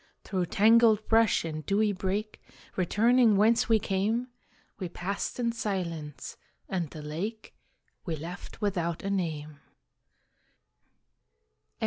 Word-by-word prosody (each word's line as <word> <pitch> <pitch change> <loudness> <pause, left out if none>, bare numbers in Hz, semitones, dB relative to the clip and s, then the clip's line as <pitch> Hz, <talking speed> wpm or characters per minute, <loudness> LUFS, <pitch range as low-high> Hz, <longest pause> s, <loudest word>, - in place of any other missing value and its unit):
Through 185 -3 -2
tangled 220 +1 +5
brush 225 -6 +3
and 155 -1 -4
dewy 210 +4 +2
brake, 200 +3 -3 0.3
Returning 220 +4 +4
whence 230 +4 +3
we 225 - +6
came, 215 +5 -1 0.5
We 185 -3 -4
passed 195 +7 -4
in 235 -1 +1
silence, 170 -10 -4 0.3
and 175 -5 -2
the 155 0 -9
lake 195 +9 -5 0.5
We 165 -4 -3
left 170 +7 -9
without 175 -5 -1
a 195 - -2
name. 155 -6 -3
195 Hz, 110 wpm, -29 LUFS, 170-220 Hz, 0.5 s, we